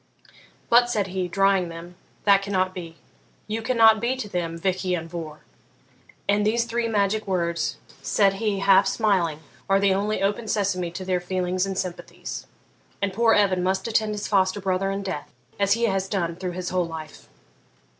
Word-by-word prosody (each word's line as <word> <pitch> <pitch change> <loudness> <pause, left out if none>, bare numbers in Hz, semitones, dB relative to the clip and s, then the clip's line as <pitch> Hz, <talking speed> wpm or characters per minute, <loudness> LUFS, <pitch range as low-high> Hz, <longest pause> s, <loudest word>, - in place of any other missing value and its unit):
'But,' 240 +1 +5
said 205 -5 0
he, 185 -1 -1
drying 195 -1 +2
them,'that 175 +4 -1
cannot 185 -2 0
be. 170 -3 -8 0.5
You 220 +1 -3
cannot 225 -2 +5
be 240 +3 0
to 255 -5 -5
them 170 -4 -3
Vich 185 +2 -1
Ian 180 -3 -1
Vohr; 160 -3 -7 0.9
and 205 +1 +3
these 230 +3 +2
three 235 0 -1
magic 210 0 0
words,' 170 -3 -1 0.2
said 200 -2 +3
he, 205 -3 0
half 195 0 +5
smiling, 185 -7 +1 0.3
'are 195 0 +4
the 195 -1 +3
only 205 +1 -1
Open 205 +3 0
Sesame 190 -4 0
to 185 +2 -7
their 185 -1 +1
feelings 185 +1 -1
and 195 -1 -4
sympathies, 180 -2 -5 0.5
and 200 -1 -1
poor 225 +2 +4
Evan 190 -3 +3
must 190 +2 0
attend 215 -1 +1
his 205 - -4
foster 190 0 +2
brother 190 0 0
in 195 +1 -3
death, 185 -6 -5 0.3
as 200 0 +4
he 230 +2 -1
has 195 -4 0
done 170 -5 -1
through 180 0 -4
his 180 0 -4
whole 180 -2 0
life.' 160 -2 -9
195 Hz, 175 wpm, -24 LUFS, 180-210 Hz, 0.9 s, But